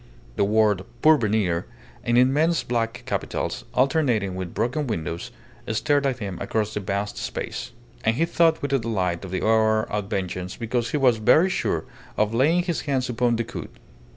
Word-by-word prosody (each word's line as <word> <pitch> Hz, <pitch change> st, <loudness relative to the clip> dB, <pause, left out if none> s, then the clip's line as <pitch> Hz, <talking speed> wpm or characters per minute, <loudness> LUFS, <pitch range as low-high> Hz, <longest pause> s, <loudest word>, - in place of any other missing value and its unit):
The -, -, +2 dB
word 105 Hz, -2 st, +3 dB, 0.2 s
"Pourvenir" 110 Hz, -, +3 dB, 0.4 s
in 120 Hz, 0 st, +2 dB
immense 150 Hz, +7 st, +3 dB
black 115 Hz, 0 st, -2 dB
capitals, -, -, -3 dB
alternating 125 Hz, -8 st, +2 dB
with 90 Hz, -2 st, -6 dB
broken 125 Hz, +7 st, -1 dB
windows, 85 Hz, -6 st, -3 dB, 0.4 s
stared 140 Hz, +6 st, +1 dB
at 130 Hz, -3 st, -1 dB
him 100 Hz, -4 st, -5 dB
across 110 Hz, -1 st, -1 dB
the -, -, -2 dB
vast 100 Hz, +1 st, -3 dB
space; -, -, -5 dB, 0.3 s
and 115 Hz, -, +2 dB
he 165 Hz, -, +2 dB
thought 165 Hz, -2 st, +2 dB
with 140 Hz, -, -2 dB
delight 100 Hz, -10 st, 0 dB
of 95 Hz, -, -6 dB
the 95 Hz, -, -2 dB
hour 110 Hz, 0 st, +3 dB
of 105 Hz, -2 st, -3 dB
vengeance, 90 Hz, -1 st, -3 dB
because 115 Hz, 0 st, -1 dB
he 150 Hz, -, 0 dB
was 125 Hz, -5 st, +4 dB
very 160 Hz, -, +4 dB
sure -, -, -1 dB, 0.3 s
of 105 Hz, +1 st, +1 dB
laying 155 Hz, +9 st, +3 dB
his 175 Hz, -2 st, -2 dB
hands 135 Hz, -4 st, -1 dB
upon 120 Hz, 0 st, +1 dB
Decoud. 115 Hz, 0 st, -4 dB
115 Hz, 165 wpm, -24 LUFS, 105-135 Hz, 0.4 s, was